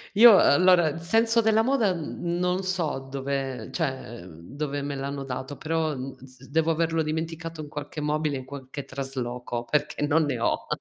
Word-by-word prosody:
Io, 225 -2 +9
allora 175 -1 +5
senso 225 +7 +3
della 220 0 +4
moda, 235 -5 +2
mhmm, 170 +1 -3
non 180 +1 0
so 180 -7 -1
dove 135 -1 -3
cioè 130 - -3
dove 140 - -5
me 140 0 -3
l'hanno 140 0 -4
dato, 135 +2 -5
però, 160 -1 -1
mhmm, 130 0 -7
s 130 0 -16
devo 160 +2 +1
averlo 165 0 +1
dimenticato 165 +1 -4
in 150 - -7
qualche 145 +1 -6
mobile 150 -1 0
in 130 - -8
qualche 135 0 -7
trasloco 125 -3 -4
perché 150 +2 0
non 160 +2 +3
ne 140 -4 -1
ho. - - 0
150 Hz, 165 wpm, -26 LUFS, 135-165 Hz, -, Io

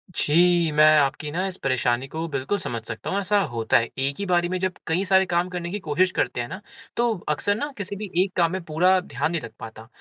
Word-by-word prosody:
जी, 170 +1 +3
मैं 150 +1 +5
आपकी 145 +1 +1
न 175 - -3
इस 190 - -5
परेशानी 130 -1 +1
को 160 +3 -4
बिल्कुल 135 +9 -1
समझ 120 -10 -4
सकता 110 -1 -5
हूँ। 195 - 0
ऐसा 200 +1 +2
होता 115 -1 +2
है 115 0 0
एक 140 +1 0
ही 200 - -2
बारी 175 -2 +1
में 185 - -1
जब 185 -1 -1
कई 170 +4 +1
सारे 190 0 +4
काम 175 0 0
करने 175 -1 -4
की 205 - -3
कोशिश 180 +5 +2
करते 120 - -1
हैं 120 - -4
ना 185 - -7 0.4
तो 240 +1 +3 0.2
अक्सर 205 +7 +1
न 290 +8 -3
किसी 200 -1 -5
भी 210 - -5 0.2
एक 190 - -5
काम 170 -1 +3
में 190 - -3
पूरा 180 +4 +3
ध्यान 175 -2 -2
नहीं 170 - -2
लग 115 - -8
पाता। 110 -1 -10
170 Hz, 245 wpm, -24 LUFS, 140-185 Hz, 0.4 s, मैं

